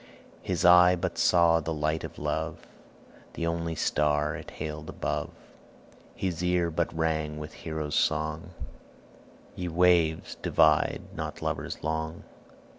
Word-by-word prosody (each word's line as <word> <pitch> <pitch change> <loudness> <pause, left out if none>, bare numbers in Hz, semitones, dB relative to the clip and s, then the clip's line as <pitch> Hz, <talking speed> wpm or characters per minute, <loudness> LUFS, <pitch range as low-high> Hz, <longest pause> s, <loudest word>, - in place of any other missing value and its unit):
His 90 -1 -1
eye 90 0 +8
but 85 -1 -3
saw 85 -2 +5
that 80 +1 -4
light 75 +1 -1
of - - -8
love, - - -3 0.7
The 85 - -3
only 85 0 -2
star 75 0 +1
it - - -8
hailed 75 0 -6
above; - - -3 0.9
His 90 -3 -3
ear 90 -1 +1
but 85 +1 -1
rang 80 -2 -1
with 75 0 -7
Hero's 80 -2 -5
song, 80 +1 0 1.1
'Ye 90 - -4
waves, 85 -2 +2
divide 75 -1 +3
not - - -5
lovers - - -3
long.' 80 +1 -3
80 Hz, 125 wpm, -28 LUFS, 75-85 Hz, 1.1 s, eye